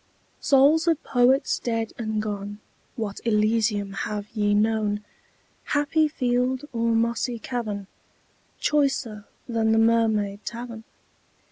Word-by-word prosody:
Souls 290 +5 +4
of 325 -2 +2
Poets 255 +2 +2
dead 230 -2 -2
and 220 -2 -2
gone, 205 -1 -5 0.4
What 210 -3 -4
Elysium 215 -2 +1
have 205 +1 -4
ye 205 -1 +2
known, 210 -1 +1 0.6
Happy 300 +2 +2
field 255 -1 0
or 230 0 +1
mossy 235 +1 0
cavern, 220 -4 -4 0.7
Choicer 270 -8 0 0.2
than 225 -2 +1
the - - +3
Mermaid 220 -3 +2
Tavern? 235 -1 -7
225 Hz, 110 wpm, -25 LUFS, 210-245 Hz, 0.7 s, Souls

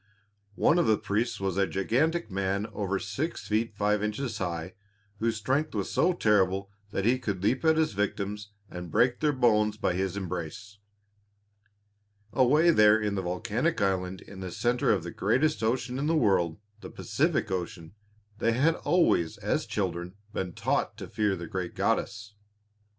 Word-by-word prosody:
One 170 - +3
of 170 - +2
the 110 -1 +4
priests 110 +2 -1
was 95 -2 -2
a 100 -1 +3
gigantic 135 - 0
man 100 +1 -1
over 100 -1 -1
six 115 - -4
feet 110 0 0
five 105 0 +1
inches 110 +4 -3
high, 85 -1 -3 0.5
whose 115 0 0
strength 135 +8 -1
was - - -2
so 180 - +3
terrible 100 - +2 0.2
that 100 -1 -2
he 125 +3 +3
could 100 -6 -3
leap 125 +8 +1
at 160 -1 +4
his 160 -8 +1
victims 100 +1 -2 0.2
and 90 -1 -7
break 120 +9 +2
their 150 -1 +2
bones 105 -5 +2
by 105 - 0
his 95 +1 -2
embrace. 95 +3 -6 1.5
Away 150 +6 +5
there 105 -6 +6
in 105 -2 -1
the 95 - -1
volcanic 110 - -1
island 95 -1 -1
in 95 - -12
the 95 -1 -5
centre 120 +6 +1
of - - +1
the - - -6
greatest 155 +1 +1
ocean 125 +3 -1
in 145 - -1
the 165 - +2
world 95 - +2 0.2
the - - -9
Pacific - - -1
Ocean 90 -2 -4 0.5
they 115 - +2
had 145 +7 +3
always 125 - +2
as - - -1
children 85 +2 -3 0.2
been 95 -2 -3
taught - - -1
to - - -7
fear 105 -2 0
the 85 -1 -6
great 85 +1 -4
goddess. 105 0 -1
105 Hz, 165 wpm, -28 LUFS, 95-125 Hz, 1.5 s, there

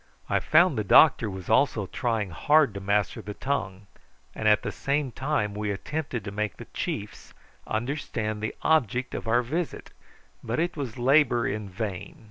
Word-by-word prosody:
I - - +1
found 155 -5 +4
the - - 0
doctor 115 +1 +6
was 95 -2 -8
also 110 -3 +2
trying 110 -2 -2
hard 145 - +3
to 100 - -5
master 100 +1 0
the 105 0 -7
tongue; 105 -8 -3 0.5
and 110 - -2
at 105 -1 +4
the - - -3
same 140 -1 -1
time 120 -5 -1
we 105 0 -3
attempted 125 +2 -4
to 100 - -6
make 105 -1 -3
the - - -9
chiefs - - -5 0.3
understand 110 -3 -3
the 110 - -3
object 130 -5 +1
of - - -5
our 120 +2 +3
visit, 160 +7 -4 0.5
but 115 +5 -2
it 175 +2 0
was 130 -6 -5
labour 125 -1 +3
in 105 0 -4
vain. 95 -2 -5
115 Hz, 170 wpm, -26 LUFS, 105-140 Hz, 0.5 s, doctor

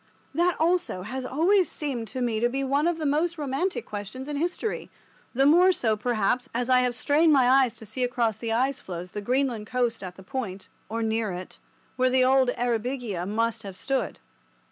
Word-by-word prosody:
That 345 +3 +2
also 340 - +1
has 255 +5 -5
always 360 +8 +3
seemed 260 -7 -4
to 255 +5 -4
me 235 -3 0
to 240 +2 +2
be 270 +2 -2
one 280 +4 +1
of 345 -1 0
the 315 - -3
most 320 +4 +1
romantic 295 +6 -2
questions 215 +6 -7
in 295 - -3
history—the 330 - -3
more 350 +6 +6
so, 225 -11 +1
perhaps, 240 +3 0
as 245 +1 0
I 255 - +6
have 250 -1 +1
strained 305 +5 +3
my 260 -3 +5
eyes 260 -2 +4
to 220 - -12
see 250 +5 -3
across 240 -3 +1
the 230 -1 -3
ice 260 +4 +1
floes 180 -3 -7
the 210 - -5
Greenland 245 -1 0
coast 245 -2 0
at 180 -1 -7
the 190 - -13
point 195 -4 -5 0.2
(or 230 +1 -2
near 220 -1 0
it) 180 +1 -8 0.4
where 255 0 +3
the 255 0 +4
old 260 -1 +4
"Eyrbyggia" 235 -5 -2
must 225 +2 -1
have 195 -3 -8
stood. 270 +4 -2
250 Hz, 195 wpm, -26 LUFS, 225-280 Hz, 0.4 s, more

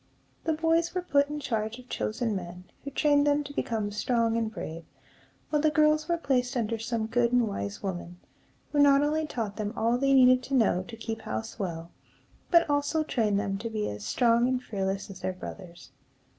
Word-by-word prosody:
The 320 - +2
boys 330 +2 +1
were 365 - -1
put 285 -4 +2
in 300 0 -4
charge 220 -4 -2
of 250 0 -14
chosen 225 -2 -2
men, 180 -1 -6 0.2
who 280 - -5
trained 290 +1 +3
them 290 0 +2
to 285 0 -9
become 220 -6 -2
strong 230 +2 +1
and 225 -1 -1
brave; 165 -4 -6 0.7
while 300 -1 +2
the 310 - +4
girls 305 +1 +3
were 340 - +2
placed 265 -4 0
under 230 -1 -1
some 225 -1 -2
good 235 +1 +1
and 245 -2 +3
wise 200 0 -5
woman, 175 -2 -5 0.5
who 295 - +1
not 285 0 +6
only 310 +1 0
taught 220 -7 -4
them 210 -1 -2
all 230 +2 +2
they 275 0 +3
needed 255 -1 +6
to 275 - -2
know 215 -7 +3
to 230 - -9
keep 225 0 -5
house 110 - -5
well, 170 -3 -4 0.6
but 340 -1 +5
also 290 +2 +1
trained 215 -8 +1
them 195 -1 -2
to 230 +2 -4
be 215 -1 -2
as 105 0 -7
strong 235 - +3
and 255 0 -1
fearless 195 -2 -3
as 185 - -10
their 185 - -2
brothers. 180 -1 -10
235 Hz, 200 wpm, -28 LUFS, 205-285 Hz, 0.7 s, not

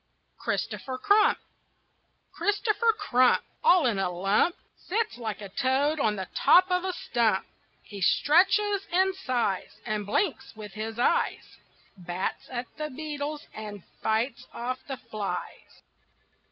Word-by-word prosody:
CHRISTOPHER 260 -1 -3
CRUMP 415 +8 +4 0.9
Christopher 425 +2 +1
Crump, 255 - +3 0.2
All 365 - +6
in 225 -5 +1
a 190 -2 +1
lump, 195 - +2 0.2
Sits 435 - -2
like 220 -3 -4
a 200 - -7
toad 275 +8 +1
on 215 -5 +2
the 190 -2 -5
top 370 +1 +5
of 360 0 +2
a 375 - -1
stump. 230 - 0 0.4
He 200 -2 -9
stretches 390 - +3
and 380 +2 +3
sighs, 245 - -2
And 215 -3 -1
blinks 270 - -1
with 210 -3 -9
his 220 +1 -5
eyes, 245 - 0 0.4
Bats 175 +1 -4
at 250 -1 -3
the 305 0 -3
beetles 295 +1 -5
and 210 -3 -8 0.2
fights 230 +3 -1
off 255 +2 -3
the 270 -2 -4
flies. 215 -4 -6
255 Hz, 130 wpm, -27 LUFS, -, 0.9 s, All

